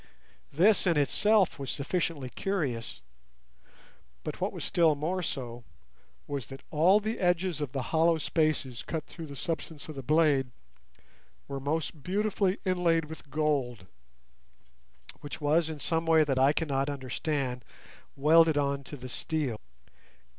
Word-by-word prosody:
This 190 +6 +4
in 170 -3 +3
itself 195 +6 +3
was 135 - -4
sufficiently 145 -3 -2
curious, 125 - -3 1.2
but - - -6
what - - 0
was - - -7
still 165 -3 +3
more 170 +6 -2
so 120 -7 -4 0.6
was 140 -6 -4
that 135 - -10
all 175 +7 +5
the 220 +2 -3
edges 175 -3 +1
of 145 -4 -3
the 135 -1 -2
hollow 165 +1 +4
spaces 155 -5 0
cut 160 -2 -4
through 165 -2 -9
the 140 - -9
substance 160 0 -4
of 155 - -6
the 135 - -6
blade 145 -2 +3 1.0
were 140 -1 -4
most 150 +2 -2
beautifully 200 +2 0
inlaid 175 -3 +2
with 155 -1 -10
gold, 140 -9 -1 1.3
which 145 - -7
was 155 +2 +2
in 155 -2 -6
some 165 +2 -1
way 160 -1 +6
that 135 -3 0
I 135 +2 +5
cannot 140 -3 -1
understand 135 -2 -3 0.5
welded 160 +2 +5
on 140 -1 0
to 145 - -8
the 130 0 -8
steel. 135 -4 -2
155 Hz, 140 wpm, -29 LUFS, 135-165 Hz, 1.3 s, way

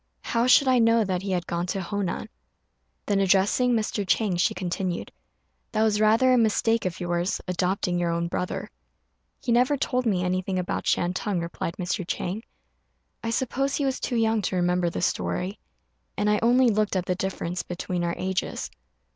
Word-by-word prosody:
How 230 +1 +1
should 265 +2 +6
I 255 -1 +4
know 230 0 +4
that 185 -3 -1
he 195 - -5
had 180 -2 -1
gone 170 +1 -2
to 195 - -2
Honan?" 200 0 -3 0.8
Then, 200 -1 +1
addressing 195 +6 +3
Mr. 215 -2 0
Chang, 195 0 +1
she 175 - +2
continued, 180 0 -3 0.6
"That 215 0 +2
was 215 -1 +2
rather 225 +4 +5
a 250 - +5
mistake 225 0 +2
of 185 -1 -3
yours, 175 +1 -1
adopting 180 0 0
your 175 -1 0
own 170 0 0
brother." 180 +1 -3 0.7
"He - - -2
never 250 +4 +3
told 255 -2 0
me 185 -4 +1
anything 185 +1 -1
about 180 -1 -2
Shantung," 180 +2 0
replied 170 0 -4
Mr. 185 +2 -2
Chang; 190 +4 -3 0.8
"I 230 - -2
suppose 265 +3 0
he 285 - 0
was 265 -1 -1
too 250 - -2
young 225 -1 +2
to 190 - -2
remember 180 0 +1
the 170 - -4
story; 185 +1 -1 0.6
and 210 - +2
I 210 - +2
only 245 +2 +5
looked 210 -1 0
at 185 -1 0
the 180 - 0
difference 180 -1 -3
between 175 0 -4
our 170 0 -1
ages." 190 0 -2
195 Hz, 180 wpm, -26 LUFS, 180-225 Hz, 0.8 s, should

